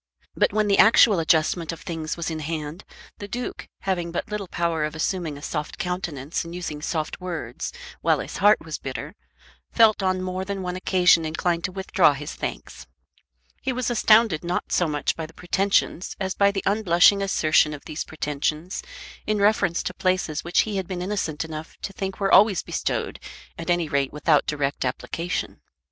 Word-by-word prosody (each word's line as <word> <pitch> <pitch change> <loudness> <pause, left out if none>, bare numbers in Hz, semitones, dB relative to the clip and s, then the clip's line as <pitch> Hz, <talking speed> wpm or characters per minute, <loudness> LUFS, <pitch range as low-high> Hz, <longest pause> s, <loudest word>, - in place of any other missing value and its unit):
But - - +2
when 215 +1 +1
the 200 - +3
actual 220 -3 +7
adjustment 160 0 +2
of 165 - -9
things 165 -4 -4
was 170 -1 -3
in 160 - -4
hand, 155 +2 -5 0.3
the 205 - -6
Duke, 245 +4 -5
having 175 -3 -1
but 175 - -4
little 210 -2 -3
power 170 -3 -1
of 150 +1 -3
assuming 160 -2 -2
a 145 - -12
soft 150 -1 -4
countenance 175 -5 -3
and 170 +1 -8
using 155 -4 -5
soft 155 +2 -3
words 165 -10 -5 0.3
while - - +3
his - - -6
heart 205 -2 +4
was 155 -1 -5
bitter, 140 +4 -6 0.6
felt 220 -3 +5
on 185 -1 0
more 185 0 -3
than 195 0 -4
one 180 0 -3
occasion 180 -2 +4
inclined 170 +2 -1
to 190 - -3
withdraw 190 -4 +3
his 145 +2 -6
thanks. - - -6 0.7
He 265 - -1
was 255 -1 -1
astounded 215 -7 +4
not 175 +1 -2
so 175 - +2
much 150 -1 -1
by 160 -1 -5
the 160 - -19
pretensions 190 0 0
as 190 -1 -1
by 200 0 +4
the 200 -1 -3
unblushing 200 -1 +4
assertion 160 -5 +3
of 150 -1 -8
these 155 - -4
pretensions 155 +3 -3 0.5
in 215 0 +1
reference 200 -4 +2
to - - -3
places 185 -5 0
which 175 - +3
he 210 -2 -3
had 190 -2 -3
been 180 -2 -4
innocent 180 -6 -2
enough 160 0 -8
to 195 - -4
think 195 0 -4
were 195 -1 +1
always 205 -3 +6
bestowed - - -2 0.4
at 165 +1 -7
any 175 -2 +2
rate 140 -2 0
without 150 0 +2
direct 145 -2 -1
application. 165 +7 -3
175 Hz, 185 wpm, -24 LUFS, 155-195 Hz, 0.7 s, actual